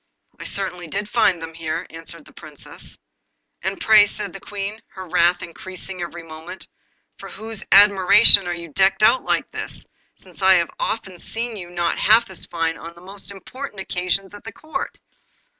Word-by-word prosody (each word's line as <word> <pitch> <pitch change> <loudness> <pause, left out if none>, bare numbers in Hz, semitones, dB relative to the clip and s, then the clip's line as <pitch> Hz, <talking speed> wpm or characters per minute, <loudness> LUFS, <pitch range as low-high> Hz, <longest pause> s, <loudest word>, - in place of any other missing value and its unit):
'I - - -8
certainly 180 -3 -3
did 205 +6 -3
find 205 -6 +2
them 165 0 -8
here,' 160 -1 -4
answered 165 -1 -10
the - - -18
Princess. - - -6 0.6
'And - - -3
pray,' 215 -1 +6
said 200 -2 -5
the 195 - -8
Queen, 205 +3 -6
her 185 -1 -8
wrath 175 +1 +2
increasing 185 +1 -8
every 170 0 -6
moment, 165 +3 -10 0.5
'for - - -9
whose 220 -1 -5
admiration 200 0 +8
are 175 - -2
you 170 -1 -9
decked 195 +5 +2
out 255 +4 +5
like - - -1
this, - - -4 0.3
since - - -14
I 190 0 +6
have 170 -2 +1
often 190 -5 -3
seen 230 +4 -5
you 175 -4 -8
not 175 -1 -1
half 225 0 +5
as 185 - -5
fine 165 -1 -2
on 165 +1 -10
the 170 - -16
most 195 +2 -9
important 205 +4 -8
occasions 190 +1 -2
at 205 - -11
Court? 310 -3 -6
190 Hz, 175 wpm, -21 LUFS, 170-205 Hz, 0.6 s, admiration